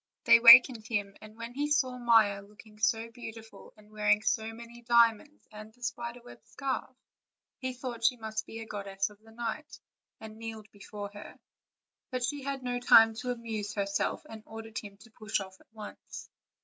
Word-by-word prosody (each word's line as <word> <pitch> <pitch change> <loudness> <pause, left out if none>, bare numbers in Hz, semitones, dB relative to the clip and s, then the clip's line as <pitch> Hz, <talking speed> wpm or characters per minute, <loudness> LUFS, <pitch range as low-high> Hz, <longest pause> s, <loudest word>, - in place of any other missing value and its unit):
They 235 -3 +8
awakened 235 -1 +8
him, 205 -3 -2
and 215 +1 -13
when 230 +1 -7
he 290 +3 -2
saw 260 -4 +1
Maia 225 -4 +4
looking 210 +1 -17
so 225 +1 0
beautiful 225 -1 -11
and 210 0 -20
wearing 210 0 +2
so 220 +1 0
many 235 +1 -12
diamonds 235 +4 +2
and 215 +1 -11
the 245 +2 -19
spider 240 0 -5
web 245 - -14
scarf, 265 -1 -5 0.6
he 260 -1 -3
thought 245 -2 -7
she 245 +2 +3
must 220 -1 -5
be 225 - -9
the 225 - -7
goddess 200 -1 -4
of 205 0 -19
night, 230 +7 -7 0.4
and 220 0 -11
kneeled 220 -2 -8
before 205 0 -9
her; 205 - -11 0.7
but 255 -1 -3
she 290 +3 -2
had 275 -1 -4
no 245 0 -2
time 225 -2 +7
to 250 +1 -5
amuse 225 -4 -4
herself, 200 -1 -2
and 220 -1 -10
ordered 225 0 -7
him 200 -2 -12
to 225 +2 -18
push 215 -1 -3
off 190 -1 -10
at - - -27
once. 215 -2 -10
225 Hz, 180 wpm, -30 LUFS, 215-240 Hz, 0.7 s, They